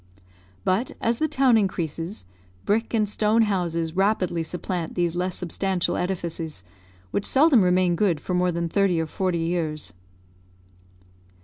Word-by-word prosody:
But 195 - 0
as 230 0 0
the 315 - +2
town 270 -6 +4
increases, 170 - -3 0.4
brick 225 +3 +1
and 215 -3 +1
stone 215 +2 +2
houses 170 -5 -1
rapidly 190 -3 +1
supplant 175 0 -4
these 175 -1 0
less 180 0 -1
substantial 180 +1 -1
edifices, 170 - -3 0.5
which 200 - -1
seldom 275 -4 +5
remain 180 -1 +3
good 175 -4 +1
for 180 - -4
more 180 0 +2
than 170 0 -2
thirty 190 -1 +2
or 160 - 0
forty 180 +2 -1
years. 165 - -2
180 Hz, 135 wpm, -24 LUFS, 170-205 Hz, 0.5 s, seldom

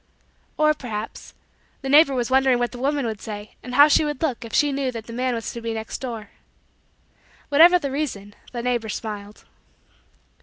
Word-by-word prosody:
Or, 305 0 +4
perhaps, 225 -7 -7 0.5
the - - -3
neighbor 285 0 +6
was 245 0 -1
wondering 265 -1 +4
what 240 0 -1
the 245 - -9
woman 280 +1 0
would 220 -3 -4
say 210 -1 -7
and 250 0 -6
how 290 +2 +8
she 305 - +4
would 295 -1 -3
look 265 -8 -1
if 230 - -9
she 295 +4 +3
knew 270 -2 -1
that 230 -2 -7
the 230 - -9
man 250 +1 -1
was 230 - -5
to 235 - -7
be 230 0 -3
next 220 0 -5
door. 230 -5 -6 1.2
Whatever 335 +5 +7
the 285 -6 -4
reason 215 -9 -4 0.2
the 240 -2 -5
neighbor 240 -3 -1
smiled. 210 -1 -6
250 Hz, 190 wpm, -23 LUFS, 225-280 Hz, 1.2 s, how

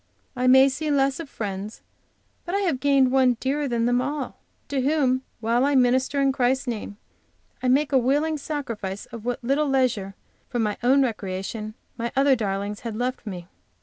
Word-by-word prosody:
I 250 0 0
may 265 +1 +7
see 290 +3 -2
less 275 -1 +2
of 325 -4 -7
friends, 205 -2 -6 0.6
but 350 +2 -3
I 400 - +1
have 335 -10 0
gained 275 -2 +3
one 260 -2 +4
dearer 285 +2 -1
than 235 -2 0
them 245 +1 +2
all, 280 0 -4 0.3
to 275 -2 0
whom, 265 -2 +2 0.2
while 235 +3 +2
I 285 +1 +2
minister 260 +2 +3
in 275 -1 +3
Christ's 260 0 +1
name, 215 -4 -5 0.6
I 255 - -1
make 280 +4 +3
a 265 - +5
willing 295 +5 +1
sacrifice 230 -10 -4
of 230 -1 -9
what 245 +1 -2
little 280 +5 +1
leisure 245 -8 0 0.3
for - - -3
my 210 -3 0
own 265 +3 +4
recreation 215 -1 -4 0.2
my 235 +1 -2
other 275 0 +4
darlings 205 -2 -3
had 230 -3 -5
left 245 0 -3
me. 180 -3 -6
255 Hz, 180 wpm, -24 LUFS, 225-275 Hz, 0.6 s, may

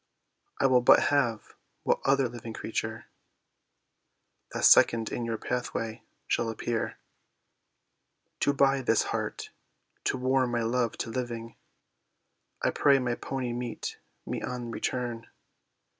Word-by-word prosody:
"I - - +2
will 130 -2 +5
but - - +6
have 120 -6 0 0.3
what - - +2
other 135 -1 +3
living 115 -1 -8
creature 110 0 -4 1.5
That - - 0
second 115 -2 +6
in 120 - -2
your 115 -1 -2
pathway 115 -1 -3 0.2
shall 115 - 0
appear." 115 +1 -2 1.4
"To 145 - +3
buy 135 -1 +3
this 115 -3 +3
heart, - - -3 0.5
to - - +1
warm 130 -1 +1
my 120 -1 +1
love 120 0 0
to 115 - -7
living, 115 -2 -4 1.1
I - - +3
pray 140 -1 +4
my 125 -2 0
pony 125 0 -3
meet 120 -1 -5 0.3
me - - -3
on 120 -1 -4
return." 120 -1 -3
120 Hz, 125 wpm, -28 LUFS, 115-130 Hz, 1.5 s, but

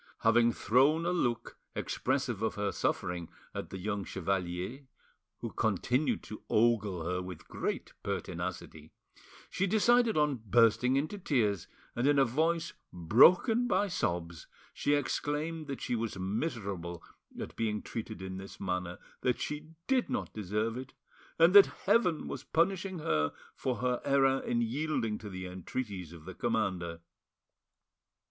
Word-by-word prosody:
Having 115 +1 +4
thrown 135 +11 +3
a 175 - +1
look 120 -10 -1 0.2
expressive 130 -5 -1
of 110 - 0
her 105 -1 -1
suffering 90 -2 -2 0.2
at - - -5
the 95 - -6
young 100 +1 -2
chevalier, 95 - -3 0.5
who - - -4
continued 120 - 0
to 110 - -8
ogle 105 -6 +2
her 90 +1 -1
with 90 -2 -8
great - - -3
pertinacity, 90 -5 -5 0.6
she 195 +2 0
decided 230 +1 +4
on 150 -5 +2
bursting 115 +4 +4
into 155 +9 -1
tears, 110 - +1 0.3
and 120 +3 +1
in 145 0 +4
a 135 - +6
voice 165 +6 0 0.2
broken 180 - +5
by 205 -3 +2
sobs 85 - -2 0.3
she 145 - +1
exclaimed 150 +3 -2
that 135 -2 -5
she 120 - -1
was 115 -3 -3
miserable 95 - -3 0.4
at - - -6
being 105 -2 -1
treated 110 -3 -6
in 95 0 -5
this 95 +1 -9
manner, 90 -2 -2 0.2
that 125 -1 +1
she 150 +1 -4 0.2
did 265 -2 +2
not 255 - -3
deserve 105 +3 -2
it, 130 +1 -8 0.4
and 165 +2 +6
that 200 -1 +10 0.2
Heaven 190 -5 +3
was - - -5
punishing 185 +2 0
her 75 - 0 0.2
for 130 -2 -2
her 125 +2 0
error 135 -1 +3
in 120 -2 -1
yielding 115 -3 -1
to 105 - -8
the 95 -1 -6
entreaties 90 0 -5
of 85 -2 -12
the 95 - -7
commander. 85 -2 -1
115 Hz, 145 wpm, -31 LUFS, 95-150 Hz, 0.6 s, that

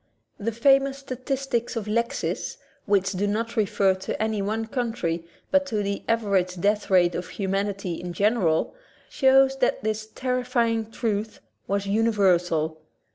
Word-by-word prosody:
The 205 - -6
X 230 - -8
famous 275 +2 +4
statistics 260 -2 -3
of 225 -3 -3
Lexis, 235 +2 -2 0.3
which 195 -2 +2
do 200 +1 -1
not 230 +3 -2
refer 205 -3 +2
to 190 0 -5
any 220 -1 0
one 220 +3 -1
country 220 -9 -2 0.2
but 280 0 +3
to 215 -5 -1
the 200 0 -2
average 195 -5 +1
death 205 +3 +1
rate 180 -2 +4
of 175 +1 -4
humanity 195 -2 -2
in 180 0 -5
general, 200 -4 +1 0.4
shows 270 0 +4
that 250 - +1
this 215 0 -2
terrifying 240 -2 -1
truth 220 -2 -2 0.3
was 200 +1 -1
universal. 180 -7 +2
215 Hz, 140 wpm, -25 LUFS, 195-235 Hz, 0.4 s, famous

